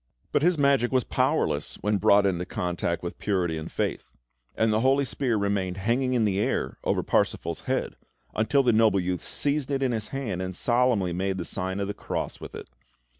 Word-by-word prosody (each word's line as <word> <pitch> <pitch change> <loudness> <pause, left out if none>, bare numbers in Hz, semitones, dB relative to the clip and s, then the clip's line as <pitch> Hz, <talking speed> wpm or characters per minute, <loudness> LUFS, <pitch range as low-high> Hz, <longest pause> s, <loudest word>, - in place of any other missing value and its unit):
But - - +2
his 175 +2 +3
magic 140 -4 +3
was 130 -2 +2
powerless - - 0
when 105 -1 +1
brought 100 +2 +5
into 90 -3 0
contact 90 -1 -2
with 85 - -6
purity 90 -5 0
and 80 - -7
faith; - - -3 0.4
and 110 -1 +2
the 110 - +2
holy 135 +3 +3
spear 125 -3 -1
remained 100 -2 -1
hanging 120 +6 0
in 120 -3 +2
the 100 -2 +1
air - - -1
over - - 0
Parsifal's 85 -1 0
head, - - -1 0.4
until 115 +6 +2
the 120 -2 +3
noble 110 -2 +4
youth 90 -1 -2
seized 145 -1 0
it 135 -1 0
in 130 - +1
his 110 -2 -2
hand, 115 -10 -3
and 95 0 -4
solemnly 120 -7 +2
made 95 +2 -1
the 85 - -4
sign 95 +1 -3
of 100 - -1
the 100 - -3
Cross - - -4
with - - -8
it. - - -8
105 Hz, 200 wpm, -26 LUFS, 95-125 Hz, 0.4 s, brought